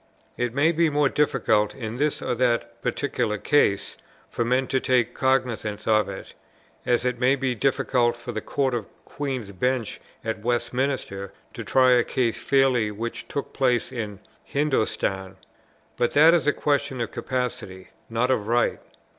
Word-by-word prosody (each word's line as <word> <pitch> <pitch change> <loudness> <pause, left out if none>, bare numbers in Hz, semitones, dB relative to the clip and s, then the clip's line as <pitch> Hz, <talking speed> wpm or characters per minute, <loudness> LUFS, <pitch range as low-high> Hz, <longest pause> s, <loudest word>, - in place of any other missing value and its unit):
It 120 -1 -1
may 150 +4 +4
be 165 0 +2
more 145 -1 +2
difficult 105 -8 +1
in 115 -3 -5
this 150 +2 0
or - - -1
that 120 -1 0
particular 120 -6 -1
case 100 -4 +1 0.3
for - - -1
men 125 +3 +1
to 130 - 0
take 125 -2 +1
cognizance 120 -6 0
of 110 -2 +3
it, 95 - -8 0.5
as 120 0 +2
it 125 -1 -1
may 130 +2 +4
be 135 -2 -1
difficult 125 -1 +1
for 120 +1 -7
the 110 -2 -4
Court 135 +1 -1
of 115 -4 -3 0.2
Queen's 130 -8 -4
Bench 125 +3 -1 0.2
at 110 -1 -3
Westminster 120 -4 -2 0.2
to - - -6
try 130 -1 +4
a 125 -1 +5
case 120 -2 -1
fairly 130 -5 +3
which 115 +3 -5
took 140 - -5
place 125 -3 +1
in 105 -5 -5 0.2
Hindostan: 110 -9 -1 0.6
but 120 -1 +1
that 160 +3 +7
is 170 -3 +2
a - - +6
question 140 -2 0
of 115 - -2
capacity, 115 -7 -4 0.2
not 115 +3 +1
of 105 -5 0
right. 120 +1 +1
125 Hz, 160 wpm, -24 LUFS, 115-135 Hz, 0.6 s, that